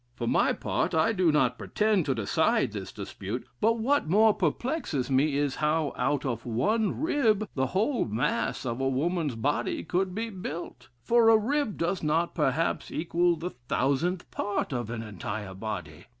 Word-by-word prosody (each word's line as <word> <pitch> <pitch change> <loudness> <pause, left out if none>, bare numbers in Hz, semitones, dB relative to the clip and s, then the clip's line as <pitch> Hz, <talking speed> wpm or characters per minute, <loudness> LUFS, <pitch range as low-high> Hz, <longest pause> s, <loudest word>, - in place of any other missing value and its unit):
"For 120 - -4
my - - +3
part, - - -1
I 160 +8 +3
do 180 -5 +3
not 130 -5 +2
pretend 210 -6 +1
to 135 - +1
decide 110 -3 +1
this - - -6
dispute, 105 +6 -6
but 230 +2 +3
what 250 - +1
more 215 +4 +5
perplexes 175 - -1
me 140 +2 +3
is, 145 -2 0
how, 155 -1 +1
out 145 -1 0
of 120 -3 -2
one 195 - 0
rib, 230 - +2
the 130 -1 0
whole 220 - +1
mass 115 +3 -1
of 120 +1 -2
a 135 - +2
woman's 150 +1 0
body 140 +6 -1
could 180 +2 -1
be 225 +1 -3
built? 160 - -7
For 235 -1 +5
a 225 - +7
rib 245 0 -1
does 170 +2 -1
not, 165 +3 +1
perhaps, 150 0 0
equal 175 +1 +1
the 170 +3 -5
thousandth 140 +8 -1
part 205 -8 -2
of 120 -3 -3
an 115 -1 -4
entire 105 -1 -5
body. 105 -1 -6
160 Hz, 170 wpm, -28 LUFS, 130-205 Hz, -, a